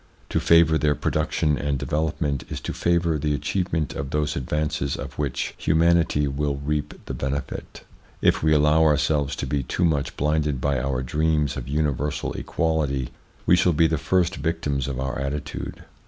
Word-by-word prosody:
To - - +1
favour 85 -1 +5
their 75 -1 +2
production 75 -4 0
and 70 0 -1
development 75 -1 -1
is - - -4
to - - -4
favour 85 -2 +1
the 75 0 0
achievement 80 -2 -1
of 70 -1 -4
those 75 0 -1
advances 75 +1 -1
of - - -6
which 70 -3 -2
humanity 80 -2 +3
will 70 +1 -1
reap 75 +1 -3
the - - -5
benefit. 70 0 -4 0.4
If - - +3
we 80 - +3
allow 75 +1 +4
ourselves 75 -1 +2
to - - -3
be 70 +1 -1
too 90 +7 -1
much 75 -4 0
blinded 75 -2 +1
by 70 0 0
our 65 0 -1
dreams 75 +2 +1
of 60 - -5
universal 75 0 -1
equality 75 -6 -1 0.4
we 90 - +6
shall 90 0 +3
be 80 +2 +4
the 80 -2 +1
first 90 0 +1
victims 75 -4 -1
of 65 -2 -3
our 65 0 -2
attitude. 70 +2 -4
75 Hz, 170 wpm, -24 LUFS, 70-80 Hz, 0.4 s, we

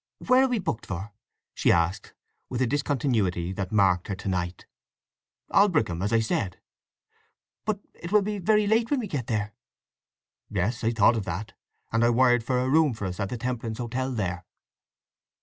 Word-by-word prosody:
"Where 255 +1 +4
are - - +2
we 250 -2 0
booked 120 - -3
for?" 95 +3 -5 0.4
she - - +2
asked, 85 +5 0 0.3
with 125 - -3
the 130 - +3
discontinuity 115 - 0
that 95 -1 -4
marked 95 -4 +3
her 100 - -2
to 95 - -8
night. 90 -2 -2 0.9
"Aldbrickham, 155 - +3
as 100 - -1
I 115 -1 +4
said." 100 -4 -2 1.1
"But 210 -1 -1
it 170 - -9
will 210 -1 +5
be 210 0 -3
very 210 +3 +3
late 225 +2 +2
when 285 - +1
we 235 - -3
get 145 - -4
there?" 105 -2 -2 1.0
"Yes. 115 +7 -1
I 115 - +3
thought 115 0 +4
of 105 - -3
that, 105 +7 -5 0.4
and 115 +1 +2
I 120 - +5
wired 120 0 +4
for 125 +2 0
a 125 +1 +1
room 150 -2 +3
for 105 - -5
us 90 +1 -5
at 100 -2 -1
the 125 - -4
Temperance 115 -2 -3
Hotel 130 +2 -2
there." 90 -6 -2
115 Hz, 185 wpm, -26 LUFS, 100-145 Hz, 1.1 s, will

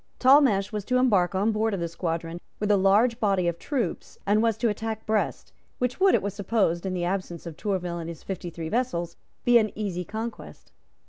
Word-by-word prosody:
Talmash 255 -7 +5
was 210 -2 -3
to 250 +2 +1
embark 200 -8 +3
on 205 +4 +2
board 215 -1 0
of - - -4
this 170 -1 -3
squadron 165 0 -3 0.2
with 210 0 +1
a - - +6
large 210 +5 +3
body 195 -5 +1
of 170 -1 -2
troops, 275 -6 -3
and 210 +2 +3
was 225 -2 +1
to 235 - +1
attack 220 0 -3
Brest, 215 -1 -1 0.2
which 250 +4 -2
would, 385 0 +5
it - - 0
was 200 -1 -2
supposed, 195 -3 0
in 185 - -2
the 175 -1 -1
absence 180 -2 -3
of 165 -2 -7
Tourville 180 -2 -2
and 165 0 -5
his 165 -2 -9
fifty 180 -2 -5
three 165 -1 -6
vessels, 175 -8 -1 0.3
be 245 -1 +7
an 215 -2 0
easy 190 -4 -2
conquest. 220 +5 -7
200 Hz, 210 wpm, -26 LUFS, 175-225 Hz, 0.3 s, be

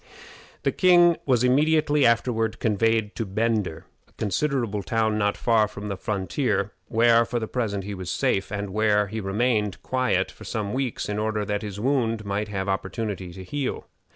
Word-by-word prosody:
The - - +2
king 175 -2 +5
was 125 -3 +3
immediately 150 +2 +3
afterward 115 -2 +1
conveyed 110 0 +1
to 115 - -2
Bender, 105 -4 -1 0.2
a - - -29
considerable 115 -1 -1
town 110 +1 0
not 100 -1 +1
far 115 -3 +3
from 105 +1 -7
the 100 - -2
frontier, 100 +1 -1 0.2
where, 115 +1 +4
for 120 +1 -3
the 110 -2 -2
present, 105 -6 -2
he 100 +2 -5
was 95 -2 -6
safe, 95 +2 0
and 100 -1 -3
where 105 0 +2
he 110 +1 -4
remained 105 0 0
quiet 125 -8 0
for - - -14
some 105 -3 -3
weeks, 130 -2 -2
in 105 0 -2
order 110 -1 -1
that 105 0 -2
his 105 -2 -6
wound 115 -3 0
might 100 +1 -2
have 95 -2 -3
opportunity 95 -1 -3
to 95 +2 -9
heal. 140 +8 -3
110 Hz, 175 wpm, -25 LUFS, 100-120 Hz, 0.2 s, king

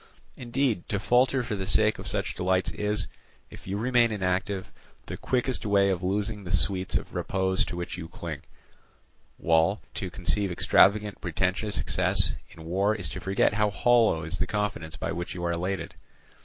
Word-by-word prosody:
Indeed, 125 -5 -1
to 100 - 0
falter 125 +5 +3
for 110 - -3
the 95 -1 -4
sake 110 +2 +3
of - - -3
such - - -1
delights 95 0 0
is, 105 0 -1 0.5
if - - -12
you 95 +1 -2
remain 120 +1 +3
inactive, 95 -1 -2 0.3
the - - -6
quickest 125 0 -1
way 100 -2 +3
of 90 -2 -2
losing 100 +2 -1
the 90 - -8
sweets 95 0 +1
of - - -2
repose 95 0 +1
to 90 - -6
which 85 +1 -5
you 80 - -6
cling; - - -6 1.0
while 85 +5 +2
to 95 - -4
conceive 95 +2 -1
extravagant 105 +3 +3
pretensions 90 +5 -1
from - - 0
success - - +2 0.2
in 80 - -13
war 100 +5 +1
is 95 -7 -1
to - - -6
forget 95 +1 +1
how 105 0 +2
hollow 110 -6 +3
is 85 +2 -4
the 95 - 0
confidence 100 -7 -3
by - - -3
which 85 +1 -4
you 85 -1 -4
are 85 - +1
elated. 90 +3 -3
100 Hz, 180 wpm, -27 LUFS, 90-105 Hz, 1.0 s, falter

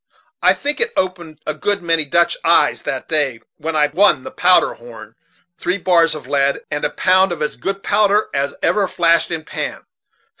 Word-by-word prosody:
I - - +4
think 290 +7 -3
I 465 - +2
opened 175 -5 -3
a 155 - -2
good 200 +5 -2
many 165 -2 +1
Dutch 170 +4 +2
eyes - - +3
that - - -5
day; 145 -7 -1 0.2
for 160 +1 -3
I 150 -1 +4
won 165 -7 +3
the - - -8
powder 180 0 +3
horn, 115 -2 -13 0.5
three 180 +2 -1
bars 170 -4 +2
of 150 - -9
lead, 140 0 0
and 145 0 -3
a - - +1
pound 185 0 +2
of 160 -3 -3
as 150 - -3
good 195 0 -4
powder 210 0 +2
as 140 0 -2
ever 205 -2 +2
flashed 170 -1 +2
in 165 -2 -4
pan. - - -5
165 Hz, 190 wpm, -18 LUFS, 150-185 Hz, 0.5 s, I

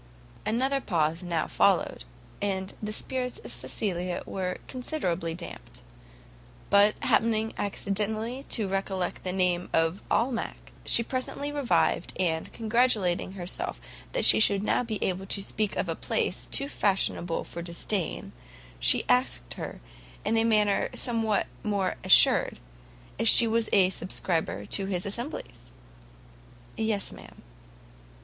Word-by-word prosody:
Another 265 +5 +1
pause 165 -4 0
now 170 -3 -1
followed, - - +1 0.4
and 190 -1 -2
the 210 0 -3
spirits 250 +3 -3
of - - -9
Cecilia 180 -4 -3
were 185 -1 -3
considerably 180 - -2
dampt; 175 - -7 0.9
but 205 +1 +5
happening 220 -1 +1
accidentally 215 +5 -2
to 215 -4 +3
recollect 190 -1 -2
the 185 - -2
name 180 -1 0
of 165 +3 +1
Almack, 235 0 -2
she 235 - +5
presently 260 +4 -2
revived, 285 -4 +1
and, 160 -3 -1
congratulating 220 -6 +1
herself 180 -2 -4 0.3
that - - +3
she - - +9
should 200 -2 +4
now 230 - +1
be 225 -3 -3
able 190 +1 -2
to 200 - 0
speak 210 +1 -1
of - - -1
a - - -1
place - - -1
too 275 - +1
fashionable 190 - 0
for 170 - -8
disdain, 170 +1 -3 0.5
she - - +5
asked 125 - +1
her, - - -7 0.4
in 215 +2 +1
a 225 - +3
manner 210 -3 +2
somewhat 225 -4 +1 0.2
more 200 -3 -1
assured, - - +5 0.6
if - - +1
she 235 - +9
was 225 0 +1
a 190 -2 +4
subscriber 170 - -1
to 195 - 0
his 185 -2 -2
assemblies? 205 - -6 1.1
"Yes, 220 -2 -1
ma'am." - - -14
200 Hz, 130 wpm, -27 LUFS, 180-225 Hz, 1.1 s, she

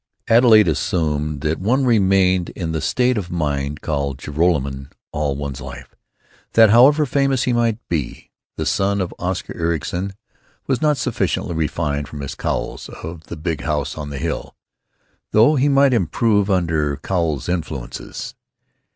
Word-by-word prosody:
Adelaide 115 -3 +6
assumed 75 -2 -1
that 80 +1 -1
one 130 +8 +1
remained 95 -5 +3
in 85 -4 -3
the 80 - -2
state 125 -2 +1
of 90 -3 -6
mind 75 -3 -2
called 70 -3 -2
Joralemon 70 -3 -1 0.2
all 75 -2 -1
one's 70 -1 -5
life; 65 -1 -9 0.6
that, 110 -2 +7
however 140 +6 +6
famous 135 -1 +1
he 125 - +1
might 115 -2 +1
be, 75 -7 -4 0.3
the - - -2
son 100 +1 +1
of 90 -2 -2
Oscar 90 +1 -3
Ericson 85 +3 -2 0.5
was 130 -2 0
not 150 -2 +3
sufficiently 105 -6 -1
refined 75 -2 -1
for 75 - -11
Miss 70 -2 -5
Cowles - - -3
of 80 0 -9
the - - -8
Big 80 -1 -3
House 75 -3 -2
on 75 -2 -6
the 70 - -6
Hill, 80 +4 -4 0.8
though 115 +8 +5
he 140 +1 +3
might 140 -1 +4
improve 105 +1 +2
under 80 -6 +1
Cowles 80 -3 -1
influences. 80 -8 -5
85 Hz, 150 wpm, -20 LUFS, 75-110 Hz, 0.8 s, that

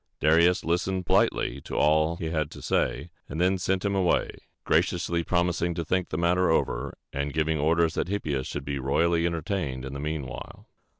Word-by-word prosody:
Darius 85 +4 +4
listened 90 +2 0
politely - - +1
to - - -7
all 80 +2 +3
he 80 -1 -4
had 75 -3 -1
to - - -11
say, 85 - -1 0.2
and 80 - -5
then 90 +2 +2
sent 95 +2 0
him 100 - +1
away, 95 -3 +2 0.3
graciously 85 0 +1
promising 85 0 0
to 85 -1 -3
think 90 +2 0
the 75 - -3
matter 90 +2 +2
over, 70 -4 0 0.2
and 70 0 -2
giving 80 0 +1
orders 80 +2 +2
that - - -1
Hippias 75 -9 -2
should 70 -1 -5
be 70 -1 -3
royally 85 +5 +2
entertained 80 -6 -3
in 65 - -6
the 70 - -5
mean 75 -1 -3
while. 65 +1 -9
85 Hz, 185 wpm, -27 LUFS, 75-90 Hz, 0.3 s, Darius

